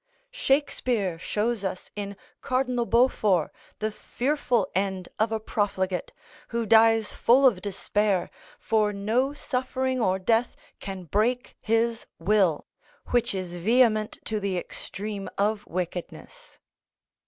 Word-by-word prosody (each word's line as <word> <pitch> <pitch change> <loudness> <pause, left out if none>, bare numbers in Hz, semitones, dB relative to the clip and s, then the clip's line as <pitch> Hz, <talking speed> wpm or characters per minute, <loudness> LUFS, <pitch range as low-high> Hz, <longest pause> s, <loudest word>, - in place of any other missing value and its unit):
Shakespeare 255 - 0
shows 215 +4 -1
us 185 -1 -4
in 200 -1 -5 0.2
Cardinal 255 -2 0
Beaufort 215 - +3 0.3
the 215 0 -2
fearful 245 -1 0
end 190 -1 -1
of 220 +1 +2
a 220 - 0
profligate, 190 -4 -1 0.4
who 235 -1 -2
dies 225 0 +5
full 260 +4 +4
of 215 -8 +4
despair, 200 0 0 0.3
for 215 -2 +1
no 225 +7 +1
suffering 260 -2 -2
or 190 -3 +2
death 225 +5 +1 0.2
can 190 -1 -6
break 225 - 0
his 225 +1 0
will, 185 -3 +2 0.4
which 240 -4 +1
is 185 -2 -4
vehement 215 +3 +2
to 215 -1 -1
the 195 -2 -1
extreme 200 +3 -5
of 210 +1 0
wickedness. 180 - -6
215 Hz, 120 wpm, -26 LUFS, 195-240 Hz, 0.4 s, dies